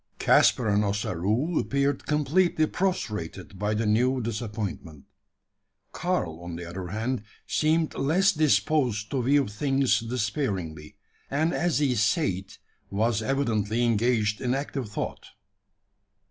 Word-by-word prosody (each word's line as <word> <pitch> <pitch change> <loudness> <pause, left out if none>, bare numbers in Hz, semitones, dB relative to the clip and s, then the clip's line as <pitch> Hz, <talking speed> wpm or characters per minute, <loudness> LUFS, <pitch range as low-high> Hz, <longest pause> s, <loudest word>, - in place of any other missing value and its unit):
Caspar 120 - +4
and 105 0 +3
Ossaroo 105 - 0
appeared 140 0 0
completely 155 +3 +2
prostrated 105 - -3
by 105 +1 0
the 110 +2 0
new 125 +5 +2
disappointment. 110 - -5 0.9
Karl, 90 - -2
on 85 -1 -7
the 85 +1 -6
other 90 +1 -6
hand, 115 +6 -2 0.2
seemed 155 +1 +1
less 180 +8 +3
disposed 125 - +1
to 135 - 0
view 140 +2 +3
things 135 +5 +1
despairingly; 105 - -3 0.3
and 155 +5 +1
as 175 -2 +1
he 140 -3 +2
sate, 110 - 0 0.3
was 110 +2 +1
evidently 115 -3 0
engaged 110 -2 +1
in 125 0 0
active 135 -4 -4
thought. 105 - -5
115 Hz, 120 wpm, -26 LUFS, 105-140 Hz, 0.9 s, Caspar